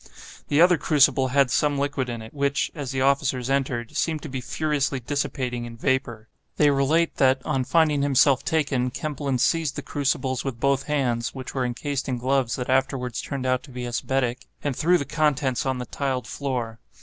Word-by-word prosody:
The 145 Hz, -, +2 dB
other 175 Hz, -2 st, +6 dB
crucible 140 Hz, -3 st, +3 dB
had 135 Hz, 0 st, +2 dB
some 145 Hz, -1 st, +2 dB
liquid 140 Hz, -2 st, -1 dB
in 115 Hz, -2 st, -5 dB
it, 110 Hz, -, -12 dB
which, 140 Hz, 0 st, 0 dB
as 145 Hz, -5 st, -5 dB
the 135 Hz, 0 st, -2 dB
officers 135 Hz, -2 st, +1 dB
entered, 130 Hz, -4 st, -1 dB
seemed 160 Hz, -2 st, -1 dB
to 155 Hz, -, -6 dB
be 130 Hz, -1 st, -4 dB
furiously 145 Hz, -1 st, -1 dB
dissipating 125 Hz, -2 st, -2 dB
in 115 Hz, -1 st, -9 dB
vapor. 120 Hz, -4 st, -1 dB, 0.3 s
They 150 Hz, -1 st, +5 dB
relate 150 Hz, +5 st, +1 dB
that, 130 Hz, 0 st, +4 dB
on 130 Hz, -1 st, 0 dB
finding 150 Hz, +1 st, +3 dB
himself 140 Hz, -1 st, +4 dB
taken, 140 Hz, -5 st, 0 dB
Kempelen 145 Hz, -2 st, -3 dB
seized 160 Hz, +3 st, +1 dB
the 145 Hz, -, -5 dB
crucibles 135 Hz, -2 st, -1 dB
with 130 Hz, -4 st, -4 dB
both 140 Hz, +1 st, +1 dB
hands 125 Hz, -6 st, -1 dB
(which 130 Hz, -2 st, -7 dB
were 130 Hz, -2 st, 0 dB
encased 135 Hz, +3 st, -3 dB
in 125 Hz, -, -1 dB
gloves 130 Hz, 0 st, 0 dB
that 125 Hz, -, -4 dB
afterwards 130 Hz, -2 st, 0 dB
turned 135 Hz, -2 st, -4 dB
out 130 Hz, 0 st, +1 dB
to 140 Hz, -, -15 dB
be 125 Hz, -1 st, -6 dB
asbestic), 125 Hz, 0 st, -2 dB, 0.2 s
and 145 Hz, -3 st, -1 dB
threw 170 Hz, +6 st, +3 dB
the 140 Hz, -, -3 dB
contents 145 Hz, -5 st, 0 dB
on 130 Hz, -1 st, 0 dB
the 125 Hz, -, -4 dB
tiled 130 Hz, -2 st, -2 dB
floor. 120 Hz, -3 st, -4 dB
135 Hz, 190 wpm, -24 LUFS, 125-145 Hz, 0.3 s, other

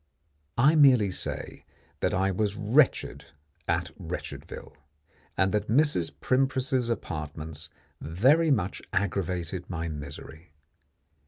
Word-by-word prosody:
I 135 Hz, +6 st, +5 dB
merely 130 Hz, -10 st, +6 dB
say -, -, -5 dB, 0.4 s
that -, -, +1 dB
I 95 Hz, +1 st, +1 dB
was 100 Hz, +1 st, 0 dB
wretched 120 Hz, +6 st, +2 dB, 0.4 s
at -, -, 0 dB
Wretchedville, -, -, -7 dB, 0.6 s
and 95 Hz, +1 st, +3 dB
that 105 Hz, 0 st, 0 dB
Mrs. 120 Hz, -, +2 dB
Primpris's 130 Hz, -1 st, +1 dB
apartments 80 Hz, -5 st, -5 dB, 0.3 s
very 130 Hz, -, +3 dB
much 100 Hz, -9 st, 0 dB
aggravated 90 Hz, -2 st, -2 dB
my 85 Hz, -2 st, -3 dB
misery. 75 Hz, +2 st, -8 dB
100 Hz, 100 wpm, -28 LUFS, 85-130 Hz, 0.6 s, merely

